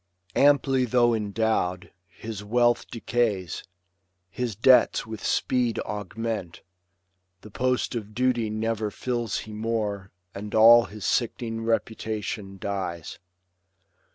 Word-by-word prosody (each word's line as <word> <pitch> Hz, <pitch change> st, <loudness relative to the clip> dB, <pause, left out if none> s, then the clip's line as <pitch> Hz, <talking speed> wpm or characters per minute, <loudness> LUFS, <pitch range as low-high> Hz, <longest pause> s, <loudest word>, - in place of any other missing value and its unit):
Amply 140 Hz, -2 st, +4 dB
though 120 Hz, 0 st, +3 dB
endow'd, 105 Hz, -3 st, -1 dB, 0.2 s
His 105 Hz, +3 st, -8 dB
wealth 120 Hz, +2 st, +2 dB
decays, 110 Hz, -7 st, -1 dB, 0.7 s
his 120 Hz, -1 st, -3 dB
debts 125 Hz, +3 st, +4 dB
with 110 Hz, -1 st, -8 dB
speed 125 Hz, -3 st, +1 dB
augment. 105 Hz, -2 st, -5 dB, 0.8 s
The 110 Hz, -, -13 dB
post 125 Hz, +3 st, 0 dB
of 110 Hz, -3 st, -6 dB
duty 120 Hz, -3 st, +1 dB
never 110 Hz, 0 st, -2 dB
fills 120 Hz, 0 st, -2 dB
he 110 Hz, -, -10 dB
more. 105 Hz, -3 st, -2 dB, 0.2 s
And 105 Hz, +1 st, -6 dB
all 115 Hz, +2 st, +8 dB
his 105 Hz, -1 st, -8 dB
sick'ning 115 Hz, -1 st, -1 dB
reputation 110 Hz, -3 st, -3 dB
dies. 95 Hz, -5 st, -4 dB
110 Hz, 105 wpm, -26 LUFS, 105-120 Hz, 0.8 s, all